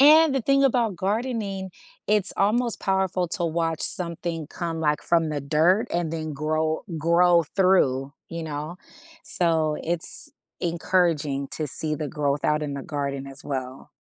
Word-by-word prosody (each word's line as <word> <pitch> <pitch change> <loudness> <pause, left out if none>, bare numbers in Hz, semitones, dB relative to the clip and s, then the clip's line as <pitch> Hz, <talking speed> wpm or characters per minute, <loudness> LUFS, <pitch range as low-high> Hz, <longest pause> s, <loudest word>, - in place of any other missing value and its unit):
And, 305 +1 +7
the 270 - +2
thing 275 +2 +3
about 235 -7 +2
gardening, 200 -2 -2 0.4
it's 210 -2 +3
almost 230 +3 +1
powerful 190 -2 0
to 175 - 0
watch 165 -1 -1
something 170 -2 -2
come, 165 -2 -4
like, 150 -1 +1
from 165 -2 +2
the 145 -1 -2
dirt, 165 - +3
and 170 -2 -1
then 155 -1 -3
grow 155 +2 -1 0.2
grow 170 +2 +4
through, 140 -7 +2 0.2
you 165 -1 -5
know? 155 +2 -5 0.5
So, 160 -3 +2
it's 170 0 -1 0.3
encouraging 165 -5 0
to 155 - -2
see 155 +3 +1
the 150 -1 -4
growth 145 0 -1
out 150 0 +2
in 145 -1 -3
the 140 - -5
garden 140 -3 -3
as 135 +2 -9
well. 130 -2 -5
165 Hz, 155 wpm, -25 LUFS, 150-190 Hz, 0.5 s, And